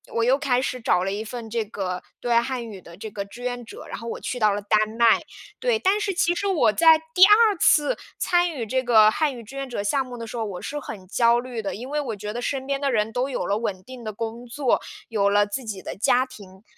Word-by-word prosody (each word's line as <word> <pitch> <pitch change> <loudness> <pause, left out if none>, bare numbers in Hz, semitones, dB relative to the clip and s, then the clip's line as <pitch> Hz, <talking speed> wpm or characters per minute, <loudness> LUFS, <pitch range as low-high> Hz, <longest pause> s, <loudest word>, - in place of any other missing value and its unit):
我 230 - +2
又 255 +3 +4
开 255 -4 +1
始 255 -2 -3
找 180 -4 +2
了 195 - -1
一 205 +2 -3
份 230 +1 -7
这 225 0 -1
个 185 -3 -4 0.2
对 240 - -4
外 235 - +5
汉 245 -1 -4
语 195 -4 -9
的 170 +1 -14
这 215 +2 -7
个 200 0 -4
志 235 +5 -12
愿 245 -1 -3
者， - - -11
然 - - -6
后 230 - -8
我 - - -4
去 250 - -4
到 215 -2 +4
了 205 - -1
丹 215 +1 +2 0.2
麦， 235 -1 +5 0.4
对。 - - +2
但 405 0 +2
是 415 - 0
其 345 -1 +2
实 400 +3 -2
我 320 - +3
在 325 -1 +6 0.2
第 365 +1 +6
2 420 +1 +6
次 295 -2 +4 0.2
参 350 -1 +2
与 250 -7 -4
这 260 +4 0
个 220 -3 +6
汉 295 +1 0
语 230 - -9
志 250 +6 -12
愿 275 -1 -4
者 220 -5 -3
项 265 +7 +1
目 245 -1 -8
的 230 - -6
时 225 - -8
候， 230 - -2
我 195 -4 -5
是 295 +1 -4
很 200 -8 -9
焦 235 +3 +3
虑 245 -2 -5
的。 200 - -4
因 245 +5 -8
为 295 +1 -1
我 235 -6 -4
觉 210 +1 -6
得 240 - -4
身 265 +1 -2
边 275 0 -2
的 275 - +1
人 220 -1 0
都 255 +2 -1
有 245 - -2
了 200 +3 0
稳 190 -5 -3
定 255 +1 -11
的 215 - -4
工 230 +3 -6
作， 260 +1 0 0.3
有 200 -3 +2
了 205 0 +4
自 225 +6 -4
己 205 -4 -6
的 - - -6
家 245 +5 +3
庭， 200 -6 -14
235 Hz, 290 characters per minute, -24 LUFS, 210-270 Hz, 0.4 s, 在